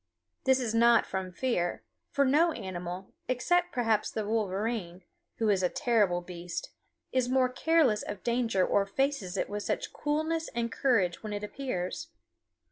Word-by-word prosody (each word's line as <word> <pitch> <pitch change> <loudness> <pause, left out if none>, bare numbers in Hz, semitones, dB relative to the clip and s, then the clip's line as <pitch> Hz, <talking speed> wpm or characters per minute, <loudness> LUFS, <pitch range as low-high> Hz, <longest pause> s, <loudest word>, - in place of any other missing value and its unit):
This 265 0 +4
is 235 -4 -1
not 235 +1 +5
from 190 -1 -4
fear, 180 -5 -1 0.3
for 280 - +2
no 315 +5 +4
animal, 185 -3 -6
except 350 +8 +1
perhaps 225 -3 +1
the 215 - -3
wolverine 205 -3 -2 0.3
who 225 - +1
is 195 -2 +3
a 180 - +2
terrible 205 -7 +2
beast 175 -1 -6 0.4
is 255 -1 +1
more 255 -1 +3
careless 255 -4 +3
of 205 -2 -6
danger 235 -5 +2
or 200 -1 +2
faces 225 -5 -1
it - - 0
with 205 0 -4
such - - -2
coolness 315 +2 -1
and 235 -1 -1
courage 200 -12 +1
when 215 -1 -5
it 205 0 -4
appears. 250 - -4
225 Hz, 155 wpm, -30 LUFS, 190-260 Hz, 0.4 s, not